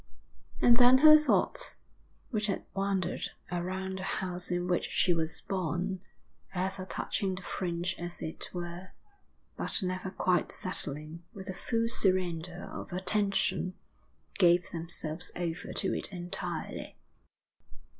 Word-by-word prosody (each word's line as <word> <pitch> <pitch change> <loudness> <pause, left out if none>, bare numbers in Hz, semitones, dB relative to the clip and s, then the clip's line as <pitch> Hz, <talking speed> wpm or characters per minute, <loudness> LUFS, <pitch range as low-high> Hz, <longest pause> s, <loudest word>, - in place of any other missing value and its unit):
And 235 -1 +7
then 250 +1 +8
her 305 +3 +10
thoughts, 300 0 +2 0.5
which 215 -2 0
had 195 - -2
wandered 195 -2 -1 0.2
around 190 +2 -2
the - - -5
house 180 -2 -2
in 175 0 0
which 180 -1 +1
she 180 - +3
was 165 -1 -1
born, 185 0 -2 0.5
ever 185 +1 -2
touching 190 0 -1
the 185 - -8
fringe 175 0 -2
as 175 0 -5
it 160 - -5
were, 175 +1 -6 0.6
but - - -1
never 185 +1 -2
quite 185 -1 +1
settling 155 -2 -2
with 190 -1 -7
the 190 - -3
full 230 +4 0
surrender 180 -4 +1
of - - -7
attention, 190 0 +1 0.6
gave 175 -1 +5
themselves 165 -1 -2
over 175 -1 -3
to - - +2
it - - -1
entirely. 175 -2 -4
185 Hz, 125 wpm, -31 LUFS, 175-195 Hz, 0.6 s, her